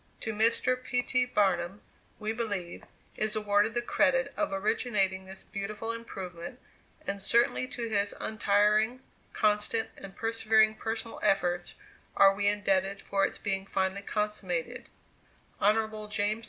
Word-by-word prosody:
To 220 - -3
Mr. 230 +4 +2
P. 245 -1 0
T. 250 0 +1
Barnum, 190 -4 +1 0.4
we 215 0 -2
believe, 205 -7 -4 0.3
is 215 0 -1
awarded 210 +1 +2
the 240 - +1
credit 270 +1 +2
of 310 - -1
originating 195 -1 0
this 190 0 -9
beautiful 215 +3 -4
improvement, 190 -2 -7 0.5
and 200 0 -3
certainly 235 +4 +3
to 240 -2 -4
his 205 -2 0
untiring, 215 +3 +2 0.3
constant, 215 +1 +2
and 195 -1 -10
persevering 220 -1 +3
personal 225 +1 -5
efforts 175 -2 +1 0.4
are 195 0 +7
we 200 +1 0
indebted 195 -1 +1
for 195 0 +1
its - - -8
being 195 -1 -2
finally 190 0 -1
consummated. 200 -5 -3 0.7
Hon. 215 +1 +1
210 Hz, 125 wpm, -29 LUFS, 195-225 Hz, 0.7 s, are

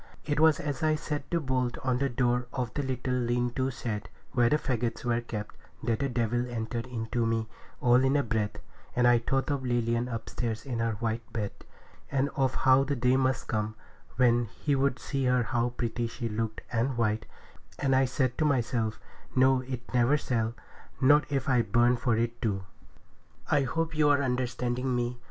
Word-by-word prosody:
It 145 0 0
was 160 -2 +5
as 145 -3 -3
I 155 -1 +3
set 150 -2 -4
the 170 - +1
bolt 130 -4 -1
on 125 -2 +1
the 140 0 +1
door 125 0 +1
of 125 -4 -2
the 145 - -1
little 130 -1 -2
lean 120 0 0
to 130 +1 0
shed, 110 -5 -4 0.2
where 120 -2 +3
the 150 - +4
faggots 120 -4 -2
were 120 0 +1
kept, 105 -3 -6 0.3
that 115 -1 0
the 140 - 0
devil 120 0 0
entered 115 +1 -3
into 115 -1 -2
me 115 -1 0 0.3
all 125 +1 +5
in 135 +2 +3
a 140 - +2
breath; 110 -3 -1 0.4
and 125 0 +4
I 120 -1 +6
thought 135 +5 0
of 140 -2 -1
Lilian 120 -1 0
upstairs 115 -1 -4
in 125 -4 -3
her 115 -1 +1
white 110 +1 -3
bed, 105 -3 -2 0.6
and 140 0 +1
of 135 -3 +1
how 130 +1 +5
the 140 +1 -1
day 125 0 +3
must 130 0 +1
come, 110 -1 -1 0.4
when 120 -2 +4
he 140 +6 -2
would 135 -1 +1
see 135 -2 -2
how 125 -1 +1
pretty 120 0 -1
she 115 +1 -4
looked 110 0 -3
and 120 +2 0
white, 110 -1 0 0.5
and 135 -1 +2
I 130 0 +4
said 130 0 -1
to - - +3
myself, 120 -6 0 0.4
'No, 130 0 +5
it 125 -1 -7
never 125 +4 +4
shall, 115 -4 -1 0.4
not 145 +3 +4
if 135 -2 -1
I 125 -3 +4
burn 120 +3 +3
for 120 -2 +1
it 115 +1 -1
too.' 100 -5 -1 0.9
I 145 - +4
hope 165 +3 -1
you 150 -1 +4
are 140 -1 +4
understanding 125 0 -1
me. 120 0 -2
125 Hz, 190 wpm, -29 LUFS, 115-135 Hz, 0.9 s, I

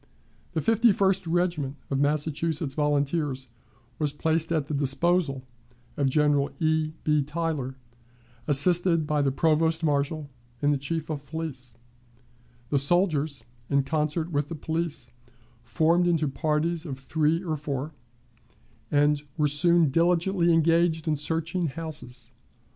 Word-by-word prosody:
The 160 - 0
Fifty 225 +5 +4
first 190 -2 +1
Regiment 165 -5 0 0.2
of 135 - 0
Massachusetts 150 +1 -1
Volunteers 145 -2 -1 0.5
was 150 -2 +1
placed 160 +2 -1
at 155 -4 0
the 150 - -4
disposal 140 +1 +1 0.5
of 140 -2 +1
General 145 0 +2
E. 155 0 0
B. 150 -1 +2
Tyler, 150 -3 -3 0.7
assisted 165 +3 +3
by 150 0 0
the 140 -1 +1
provost 160 +3 +1
marshal 145 0 0 0.3
and 145 +2 +2
the 140 - -1
chief 160 +3 -3
of 145 -2 -6
police. 135 -5 -6 1.0
The 140 - +3
soldiers, 155 -2 +2 0.3
in 140 0 +2
concert 155 +3 -1
with 145 -1 0
the 165 - -6
police, 160 -4 -4 0.5
formed 165 +8 +2
into 165 -3 +1
parties 155 +4 -1
of 140 -6 -6
three 155 +5 0
or 160 -3 -2
four, 145 0 -4 1.0
and 145 0 +2 0.2
were 150 -1 +3
soon 165 +1 +3
diligently 175 +2 +2
engaged 165 0 +2
in 155 - +2
searching 165 +4 -1
houses. 135 -6 -6
155 Hz, 130 wpm, -26 LUFS, 145-165 Hz, 1.0 s, Fifty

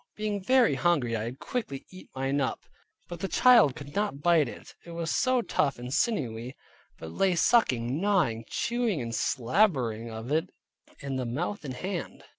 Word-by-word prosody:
Being 210 -1 -2
very 255 +3 +4
hungry 145 -10 +1
I 110 0 -2
had 120 +3 -6
quickly 140 - -5
eat 185 0 -13
up - - -36
mine, 135 0 0 0.5
but 175 -1 -7
the 195 - -2
child 235 - +5
could 145 0 -10
not 205 -7 -1
bite 160 -4 +3
it, - - -11
it 170 - -10
was 165 -1 -2
so 255 -1 +2
tough 140 -9 0
and 125 +2 -6
sinewy, 125 - -1 0.4
but 80 - -8
lay 185 - +1
sucking, 135 - +2
gnawing, 175 - +1
chewing 235 -7 -1
and 115 -2 -4
slabbering 120 - +1
of 110 +3 -7
it 160 +4 +1 0.5
in 140 -2 -3
the 130 - -2
mouth 165 +12 -3
and 130 -3 -5
hand. 185 +4 -5
150 Hz, 175 wpm, -28 LUFS, 125-200 Hz, 0.5 s, child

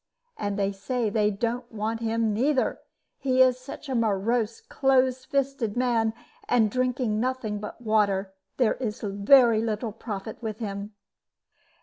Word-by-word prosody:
And 205 - -3
they 200 -1 +1
say 215 +3 -2
that - - -11
they 210 -2 +3
don't 235 +4 -3
want 220 +1 -2
him 225 -1 0
neither, 260 +4 +1 0.4
he 260 -2 +1
is 255 -1 +5
such 265 +3 -9
a 265 - -3
morose, 225 0 0
close 260 -1 +1
fisted 275 -5 -1
man; 230 -3 +1 0.3
and 225 -4 +3
drinking 250 -3 0
nothing 245 -4 -2
but 210 +2 -7
water, 205 -4 +1 0.2
there 245 -4 +3
is 230 -3 -4
very 220 +3 +5
little 225 0 -2
profit 215 0 -7
with 220 -2 -4
him." 205 -1 -5
225 Hz, 145 wpm, -26 LUFS, 210-255 Hz, 0.4 s, is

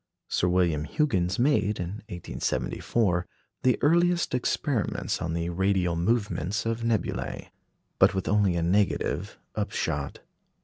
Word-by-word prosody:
Sir 90 - +1
William 85 -4 +2
Huggins 95 - 0
made, 110 -6 +2
in 90 +4 -4
1874, 90 +1 -1 0.3
the 130 -1 +3
earliest 170 +2 +3
experiments 125 - -1
on 85 -1 -2
the 85 0 -1
radial 90 -1 +1
movements 100 0 0
of 115 0 -1
nebulæ. 115 -1 -2 0.5
But 95 - +5
with 95 - -2
only 100 -3 +3
a 85 - 0
negative 95 +4 0 0.2
upshot. 70 -1 -2
95 Hz, 120 wpm, -27 LUFS, 85-115 Hz, 0.5 s, But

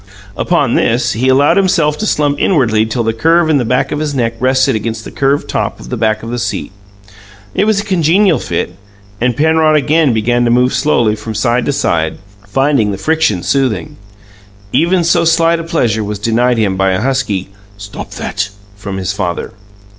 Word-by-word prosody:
Upon 145 -8 +1
this, 120 +2 +1
he 125 +4 0
allowed 140 +6 +4
himself 180 -6 +2
to 215 - -1
slump 145 -4 0
inwardly 115 - +2
till 115 +2 -2
the 115 0 0
curve 165 +7 +2
in 145 - +3
the - - 0
back 125 +3 0
of 150 - -2
his 150 -2 -3
neck 115 -3 0
rested 130 0 +2
against 110 0 -4
the - - -8
curved 140 +1 0
top - - -2
of - - -11
the 125 - -2
back 110 -1 0
of 115 - -6
the 120 - -3
seat. - - -3 0.8
It 200 - +1
was 215 -2 +2
a - - -2
congenial 185 -1 +2
fit, 85 0 -3 0.5
and 120 -1 0
Penrod 160 0 +3
again 150 0 +2
began 120 +2 +1
to - - +2
move 125 +2 +2
slowly 125 -5 +1
from 110 +1 -7
side 120 +2 0
to - - +2
side, 85 - -1 0.3
finding 135 0 +1
the 100 - -3
friction 155 - 0
soothing. 125 - -1 0.8
Even 175 +2 +2
so 170 +1 +2
slight 165 0 +2
a - - -4
pleasure 120 -10 0
was 105 0 -4
denied 115 +4 +1
him 100 -4 +1
by 95 0 +2
a 95 - -1
husky, 115 -8 -1 0.3
"Stop 100 0 -8
that!" 100 0 -3 0.3
from 100 -1 -6
his 95 +1 -2
father. 90 -3 -3
125 Hz, 190 wpm, -14 LUFS, 110-155 Hz, 0.8 s, allowed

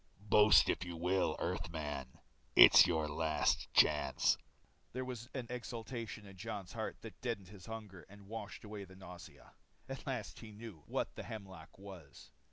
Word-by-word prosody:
"Boast 105 +1 +6
if - - 0
you 90 -1 -6
will, 90 +3 +1
Earthman, 80 -7 -4 0.4
it's - - +10
your 80 -3 0
last 80 +1 0
chance." 75 -3 +4 0.6
There 130 +1 -3
was 120 -2 -7
an 130 -3 -3
exultation 115 -2 -6
in 100 -1 -12
Jon's 100 -2 -6
heart 110 -2 -4
that 115 - -11
deadened 110 -7 -3
the 100 +1 -11
hunger 105 -5 -8
and 100 0 -14
washed 110 0 -7
away 105 -1 -7
the 95 0 -15
nausea. 90 -7 -12 0.4
At 135 +2 -7
last 125 -5 -4
he 110 -2 -10
knew 105 -6 -10
what - - -2
the - - -7
hemlock 95 -7 -9
was. 95 -7 -12
100 Hz, 160 wpm, -35 LUFS, 85-110 Hz, 0.6 s, it's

